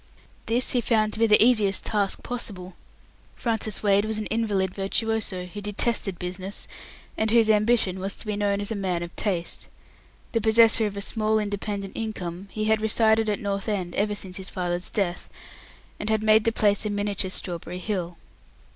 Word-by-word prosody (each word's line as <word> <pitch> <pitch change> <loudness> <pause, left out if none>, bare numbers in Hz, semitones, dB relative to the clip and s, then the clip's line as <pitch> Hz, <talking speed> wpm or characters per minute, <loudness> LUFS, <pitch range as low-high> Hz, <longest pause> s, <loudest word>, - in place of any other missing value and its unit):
This 240 +3 +1
he 245 - +1
found 215 -2 +1
to - - -3
be 230 - +4
the 210 0 +6
easiest 215 -5 +3
task 205 -3 0
possible. 195 -7 -5 0.6
Francis 220 -3 -1
Wade 200 0 +3
was 215 0 -1
an 215 - -3
invalid 205 -5 0
virtuoso, 200 -1 -1
who 195 +3 -8
detested 205 -2 0
business, 185 +3 -4 0.5
and 220 - +1
whose 225 -1 +4
ambition 210 -3 +2
was 195 +2 -2
to - - -6
be 210 -1 -2
known 205 -1 0
as 205 - -3
man 185 -5 -1
of 175 - -9
taste. 180 -5 -1 0.6
The 230 - 0
possessor 220 0 +5
of 200 -1 -7
a - - -3
small 215 +1 +1
independent 205 -1 -3
income, 195 -4 -5
he 215 +2 -4
had 220 0 +2
resided 220 0 +3
at 205 - 0
North 200 0 -2
End 185 -4 -2
ever 210 0 0
since 190 -3 -5
his 190 0 -3
father's 180 -1 -2
death, 180 -4 -2 0.7
and 210 - -2
had 220 0 +1
made 215 0 +4
the 230 - +3
place 205 -2 +2
a 215 - -1
miniature 205 -2 -1
Strawberry 175 -1 0
Hill. 180 -3 -4
205 Hz, 180 wpm, -25 LUFS, 190-220 Hz, 0.7 s, the